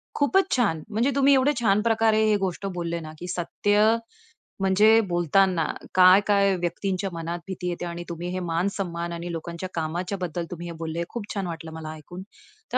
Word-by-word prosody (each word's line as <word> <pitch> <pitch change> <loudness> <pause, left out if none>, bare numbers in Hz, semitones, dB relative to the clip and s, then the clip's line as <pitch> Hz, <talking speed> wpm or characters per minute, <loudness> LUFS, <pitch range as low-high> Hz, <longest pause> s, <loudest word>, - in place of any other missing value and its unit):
खूपच 380 +7 +2
छान. 200 -11 +1
म्हणजे 230 +6 +1
तुम्ही 280 0 +5
एवढे 270 +2 +4
छान 210 -2 +3
प्रकारे 225 -1 +3
हे 215 -1 +3
गोष्ट 190 0 -3
बोलले 170 -1 -2
ना 155 -1 -8
की 180 - -7
सत्य, 205 +4 +1 0.8
म्हणजे 210 +4 +5
बोलताना 175 0 +2 0.3
काय-काय 195 +1 +5
व्यक्तींच्या 185 +2 -2
मनात 170 +1 -4
भीती 185 -1 -5
येते 175 0 -4
आणि 175 0 -5
तुम्ही 170 +1 -5
हे 185 - -2
मान 165 +3 +1
सम्मान 170 -3 -3
आणि 170 +1 -5
लोकांच्या 170 +2 -5
कामाच्याबद्दल 175 +1 -3
तुम्ही 175 0 -6
बोलले 165 +1 -3
खूप 235 -4 -5
छान 195 -3 -3
वाटलं 165 -1 -7
मला 160 -1 -6
ऐकून. 175 +4 -10 0.5
तर - - +3
180 Hz, 170 wpm, -25 LUFS, 170-205 Hz, 0.8 s, तुम्ही